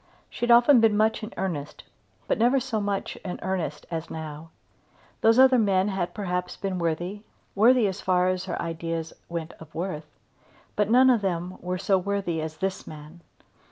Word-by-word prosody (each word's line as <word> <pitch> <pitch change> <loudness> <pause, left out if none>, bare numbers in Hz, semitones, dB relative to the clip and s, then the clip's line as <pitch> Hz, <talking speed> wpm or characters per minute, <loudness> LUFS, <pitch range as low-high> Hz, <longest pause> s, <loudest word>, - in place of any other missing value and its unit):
She 240 - -2
had - - +3
often 240 +3 +7
been 220 -2 +4
much 220 +1 +2
in 215 +1 -6
earnest 165 -7 -4 0.4
but - - 0
never 245 +4 +4
so 245 -5 -2
much 200 -1 -3
in 180 - -6
earnest 180 -6 -3
as 165 0 -4
now. 155 0 -7 0.7
Those 225 +1 +5
other 260 -1 +6
men 195 -2 +2
had 180 -3 -3
perhaps 180 -3 -3
been 190 -2 -3
worthy, 175 +4 -2 0.3
worthy 235 +3 +5
as 195 0 -4
far 180 -1 +2
as 185 0 -1
her 185 - -4
ideas 165 -1 -4 0.2
went 170 -1 -5
of 160 -2 -14
worth, 160 -3 -4 0.7
but 210 0 +1
none 255 +3 +6
of 235 -4 +2
them 180 -1 -2 0.2
so 195 +1 +2
worthy 190 -4 -2
as 155 0 -6
this 190 +3 -3
man. 155 +3 -11
190 Hz, 175 wpm, -26 LUFS, 165-215 Hz, 0.7 s, often